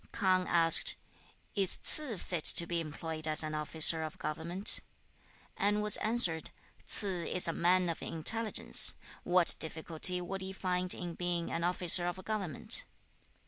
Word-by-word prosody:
K'ang 185 -2 -1
asked, 165 -1 +6 0.6
'Is 195 -3 -2
Ts'ze 280 -9 0
fit 170 -4 -6
to 170 - +6
be 170 0 -4
employed 155 0 -6
as 155 +1 +4
an 155 0 -6
officer 155 +1 +2
of 155 -1 -8
government?' 165 +6 -2 0.8
and 210 +1 -2
was 210 -1 +4
answered, 210 -8 -1 0.4
'Ts'ze 185 -5 -2
is 180 - +3
a 165 - -3
man 180 +2 0
of 165 - -6
intelligence; 220 +8 +1 0.3
what 180 -1 +3
difficulty 160 +3 +2
would 190 +2 -7
he 190 0 -8
find 180 -1 -4
in 175 -1 -8
being 175 -1 -4
an 170 - -5
officer 175 0 +2
of 185 +1 -7
government?' 200 -8 -3
175 Hz, 145 wpm, -30 LUFS, 165-190 Hz, 0.8 s, asked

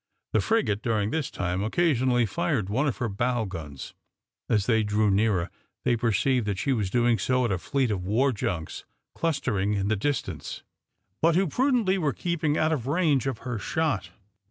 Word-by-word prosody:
The - - +3
frigate, 210 - +1
during 110 -3 0
this 160 -3 -1
time, 90 +1 -2
occasionally 125 -2 +2
fired 130 - -1
one 130 +8 +1
of 125 -8 -1
her 120 - -1
bow 120 +3 0
guns. 75 -8 -7 0.6
As 105 -3 +2
they 110 -2 +3
drew 105 0 +2
nearer, 95 -3 +1 0.3
they 125 -2 +3
perceived 120 +1 +1
that 100 -2 -1
she 135 +7 0
was 105 -6 -1
doing 120 +1 +2
so 130 -1 +1
at 115 - 0
a 95 - 0
fleet 130 +3 0
of 95 -3 -2
war 120 +9 +2
junks 100 -8 -4 0.3
clustering 120 - 0
in 100 -1 0
the 110 - +2
distance, 140 +7 -3 0.6
but 165 0 +4
who 190 +2 +3
prudently 230 - +2
were 150 -6 0
keeping 160 0 -1
out 155 +1 +2
of 130 -5 -3
range 145 -4 +2
of 130 -4 -2
her 120 -4 -3
shot. 105 - -1
120 Hz, 180 wpm, -26 LUFS, 105-145 Hz, 0.6 s, but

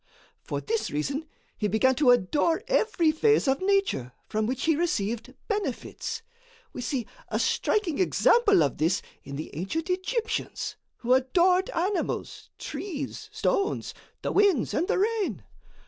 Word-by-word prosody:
For - - -4
this 450 0 -1
reason 280 - -2 0.3
he 210 - -1
began 220 +6 +3
to 290 -4 +4
adore 290 - +3
every 430 -10 +3
phase 430 +2 +3
of 270 +4 +2
nature 385 - +1
from 215 0 -1
which 255 +1 -2
he 320 -1 +4
received 240 - -1
benefits. 410 - -3 0.5
We - - -5
see 245 -2 -2 0.2
a - - 0
striking 375 -8 +1
example 405 +2 +4
of - - -2
this 165 +4 +1 0.2
in 140 - -7
the 150 0 -6
ancient 320 - -2
Egyptians, 445 +5 -2 0.2
who 245 +1 +2
adored 350 +9 +3
animals, 375 +3 -2
trees, 295 -9 -5
stones, 400 +1 0 0.3
the - - -1
winds 395 - +3
and 345 - +1
the - - +1
rain. 395 - 0
320 Hz, 140 wpm, -27 LUFS, 245-395 Hz, 0.5 s, to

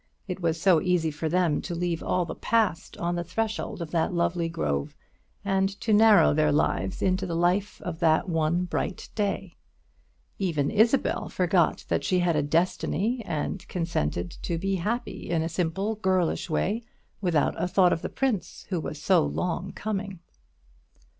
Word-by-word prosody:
It 185 -1 -4
was 165 -1 0
so 170 -3 +4
easy 175 -3 +1
for 155 +2 -3
them 175 -3 +2
to 175 - -5
leave 170 -1 -1
all 180 -1 0
the - - -5
Past 220 -7 0
on 175 0 -1
the 175 - -2
threshold 220 -1 -3
of 155 - -9
that 165 -2 +1
lovely 170 -1 0
grove, 70 - -2 0.5
and 195 -1 +2
to 220 - 0
narrow 215 -4 +6
their 150 0 +3
lives 150 +5 0
into 190 0 +1
the 170 - -3
life 180 +4 +1
of 165 -2 -5
that 160 +2 +3
one 165 +1 +1
bright 180 +1 -3
day. 195 -4 -2 0.8
Even 160 -7 0
Isabel 230 +5 +2
forgot 180 -2 +1
that - - 0
she 185 - +1
had 175 -2 +2
a 150 - +2
Destiny, 185 - 0
and 160 +4 -3
consented 90 - -2
to 170 - -2
be 195 +3 -1
happy 220 +8 -3
in 165 -2 +1
a - - -1
simple 180 +5 -1
girlish 185 -4 0
way, 205 +8 0 0.4
without 170 -6 +2
a - - +1
thought 180 -1 +4
of 165 - -3
the - - -4
prince 250 -9 -2
who 180 -3 -1
was 155 -1 -5
so 175 +1 +4
long 180 +1 -2
coming. 200 -2 -4
175 Hz, 170 wpm, -27 LUFS, 165-195 Hz, 0.8 s, narrow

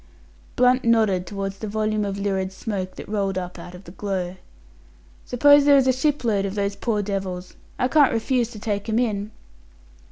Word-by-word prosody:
Blunt 250 +1 +3
nodded 215 -6 +2
towards 195 -1 -5
the 215 - -5
volume 215 0 -1
of 200 -1 -3
lurid 195 -1 -1
smoke 190 -2 -5
that - - -9
rolled 195 -2 -1
up 180 -1 -5
out 175 +1 -10
of 180 - -12
the 175 - -12
glow. 190 -2 -3 0.9
"Suppose 285 +3 +5
there 285 -1 +7
is 270 - +4
a 260 - +4
shipload 250 -7 0
of 195 0 -3
those 200 -1 -1
poor 215 -4 -1
devils? 190 -2 -4 0.2
I 250 - +1
can't 290 0 +4
refuse 235 +1 0
to 225 -3 -10
take 205 0 -3
'em 220 - +1
in." 210 -4 -1
205 Hz, 185 wpm, -23 LUFS, 195-235 Hz, 0.9 s, there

